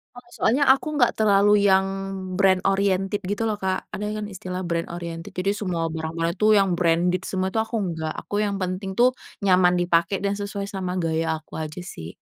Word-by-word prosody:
Heeh. 245 -1 -14
Soalnya 265 +6 +2
aku 270 +3 +4
nggak 245 - +3
terlalu 205 -1 +4
yang 190 0 +4 0.5
brand 190 0 +4
oriented 195 0 +1
gitu 205 +4 -1
loh, 215 - 0
Kak. 190 -2 -2
Ada 210 - -5
yang - - -4
kan 210 - -4
istilah 185 0 -5
brand 170 0 -2
oriented. 170 -1 -6
Jadi 195 +3 -1
semua 175 -5 -2
barang-barang 165 +1 -3
itu, 210 +3 +2
yang 195 -4 +4
branded 175 +2 +1
semua, 190 -1 -2
itu 220 - 0
aku 225 - -6 0.2
nggak. 160 -1 -3 0.2
Aku 205 - -4
yang 200 -1 -2
penting 185 +1 -3
tuh 250 +1 +4 0.3
nyaman 180 -2 +4
dipakai, 175 +2 +1
dan 200 0 -1
sesuai 200 0 -4
sama 185 -2 -3
gaya 160 -1 0
aku 155 - -14
aja, 155 +2 -5
sih. 85 - -8
185 Hz, 195 wpm, -24 LUFS, 170-200 Hz, 0.5 s, aku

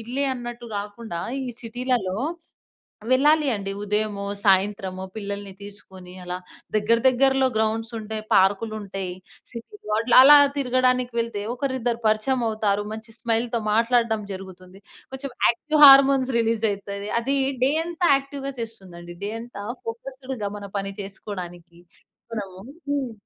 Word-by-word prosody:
ఇళ్లే 250 +5 -2
అన్నట్టు 240 -1 -7
గాకుండా, 205 -3 -5 0.2
ఈ - - -5
సిటీలలో 240 -5 -2 1.0
వెళ్ళాలి 295 +2 +4
అండి. 195 -1 -4
ఉదయమో, 210 -1 -1 0.2
సాయంత్రమో, 190 -1 +1
పిల్లలిని 200 -2 -5
తీసుకొనీ 190 -3 -12
అలా 180 0 -4 0.4
దగ్గర 220 +2 +3
దగ్గరలో 265 +1 +3
గ్రౌండ్సుంటాయి, 220 0 -2
పార్కులుంటాయి. 195 -1 0 0.4
సిటీలో 235 - -8
అట్లలా 255 +5 +8 0.2
తిరగడానికి 255 -1 +1
వెళ్తే, 230 -3 -3
ఒకరిద్దరు 250 -3 -2
పరిచయమవుతారు. 215 -3 0
మంచి 220 +1 -10
స్మైల్‌తో 230 0 0
మాట్లాడడం 230 -1 +2
జరుగుతుంది. 185 0 -11 0.3
కొంచెం 265 0 -6 0.2
యాక్టివ్ 305 +6 0
హార్మోన్స్ 270 -1 +7
రిలీజయితది. 205 -3 -2
అదీ 275 +4 -1 0.3
డే 270 - +3
అంతా 345 0 0
యాక్టివ్‍గా 275 0 -5
చేస్తుందండి, 180 -6 -8
డే 205 - -2
అంతా 235 -4 -9 0.2
ఫోకస్‌డ్‌గా 255 -2 -5
మన 200 - -8
పని 195 0 -4
చేసుకోడానికి. 175 -3 -9 0.5
మనము 195 -4 -6 0.3
హ్మ్. 275 -5 -1
225 Hz, 110 wpm, -24 LUFS, 200-255 Hz, 1.0 s, అట్లలా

